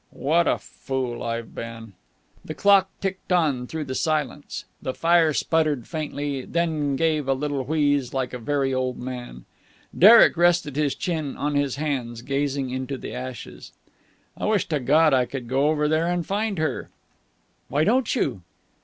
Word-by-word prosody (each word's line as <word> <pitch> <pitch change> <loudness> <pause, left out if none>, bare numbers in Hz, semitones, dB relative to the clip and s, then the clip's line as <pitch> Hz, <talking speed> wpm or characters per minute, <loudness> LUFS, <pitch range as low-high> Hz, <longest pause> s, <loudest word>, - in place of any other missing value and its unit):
"What 165 +5 +1
a - - +2
fool 120 +2 -5
I've 115 -1 -4
been!" 115 -2 -8 0.5
The 155 - -7
clock 195 +1 +4
ticked 190 -1 -4
on 150 -8 +1
through 160 +2 -4
the 130 - -5
silence. 150 0 -2 0.2
The 130 - -4
fire 165 -1 +4
sputtered 155 -5 0
faintly, 145 -3 -3
then 155 -4 -1
gave 155 -1 0
a 135 - +2
little 145 0 -2
wheeze, 145 -3 +1
like 130 -2 -2
a 125 - -5
very 135 +2 0
old 130 -1 -1
man. 125 - -7 0.5
Derek 220 +3 +8
rested 175 -4 +2
his 150 -2 0
chin 160 -6 -3
on 145 +1 -1
his 145 -2 0
hands, 130 -6 -3
gazing 140 -1 -1
into 130 +1 -4
the - - -7
ashes. 125 -1 -8 0.6
"I - - -4
wish 210 -2 +1
to 150 -3 0
God 150 +4 +4
I 130 -1 +3
could 130 -3 -6
go 135 +4 +2
over 150 -1 +1
there 155 +2 +1
and 175 -1 -1
find 205 +2 -1
her." 155 0 -2 0.8
"Why 145 +4 +1
don't 240 +7 +2
you?" 100 - -1
145 Hz, 165 wpm, -24 LUFS, 130-160 Hz, 0.8 s, Derek